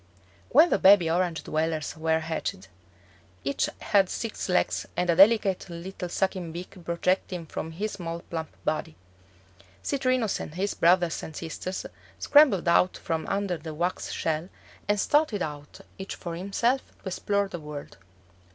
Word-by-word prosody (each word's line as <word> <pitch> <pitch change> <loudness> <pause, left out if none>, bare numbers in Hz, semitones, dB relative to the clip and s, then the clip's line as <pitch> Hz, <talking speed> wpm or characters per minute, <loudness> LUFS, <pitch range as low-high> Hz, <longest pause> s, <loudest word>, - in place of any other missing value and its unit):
When 310 +6 +6
the - - +3
baby 190 -4 +6
Orange 175 -1 0
dwellers 155 -1 -1
were 160 0 +1
hatched, 155 - -4 0.7
each 140 +1 0
had 195 -3 +3
six 225 -4 -4
legs 180 - +1
and 180 -1 +2
a - - +2
delicate 195 -1 +5
little 175 +1 -6
sucking 185 -2 -1
beak 175 +4 -8
projecting 175 0 -1
from 160 +1 -5
his 210 +6 -3
small 170 -2 -5
plump 160 -2 -5 0.2
body. 155 - -1 0.9
Citrinus 255 -6 0
and 155 - -7
his 195 +3 -1
brothers 175 0 +3
and 160 - -8
sisters 175 +4 -5 0.3
scrambled 270 - +5
out 170 +2 +4
from 160 -1 -3
under 195 -4 -1
the 160 -2 -7
wax 175 +3 -2
shell 160 +2 -2 0.4
and 205 0 +2
started 290 - +2
out 145 -1 -7 0.2
each 190 - -5
for 170 -2 -6
himself 200 +9 0 0.2
to 190 - -3
explore 200 +2 0
the 175 - -6
world. 150 -6 -8
180 Hz, 150 wpm, -27 LUFS, 160-200 Hz, 0.9 s, When